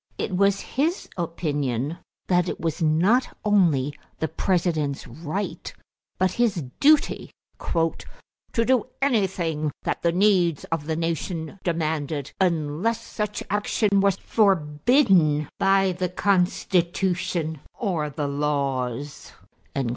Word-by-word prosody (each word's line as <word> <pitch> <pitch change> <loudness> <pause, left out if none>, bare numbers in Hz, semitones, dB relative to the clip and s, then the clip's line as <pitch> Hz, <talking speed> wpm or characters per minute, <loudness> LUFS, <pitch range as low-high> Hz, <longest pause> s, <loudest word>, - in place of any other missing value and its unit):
It 185 - -2
was 200 +1 +3
his 320 +8 -1
opinion 150 -5 -2 0.3
that 180 -1 +2
it - - -4
was 165 +1 -2
not 175 +11 +2
only 165 -10 +3 0.2
the 160 - -1
President's 160 -6 0
right 170 +6 -5 0.5
but 185 -1 +2
his 215 -8 +1 0.2
duty 300 +1 +3 0.3
"to 165 +7 -3
do 255 -2 +2
anything 185 - 0
that - - -2
the 170 - +2
needs 180 -4 +3
of 160 -2 -2
the 160 - 0
nation 165 +1 -3
demanded 155 -4 -2
unless 170 +5 +1
such 210 -2 -4
action 205 0 +1
was 195 -1 +3
forbidden 180 - +3
by 195 0 +3
the 180 0 -2
Constitution 180 -3 0 0.2
or 175 - -1
the 145 0 -3
laws." 140 -2 -2
175 Hz, 110 wpm, -24 LUFS, 150-200 Hz, 0.5 s, was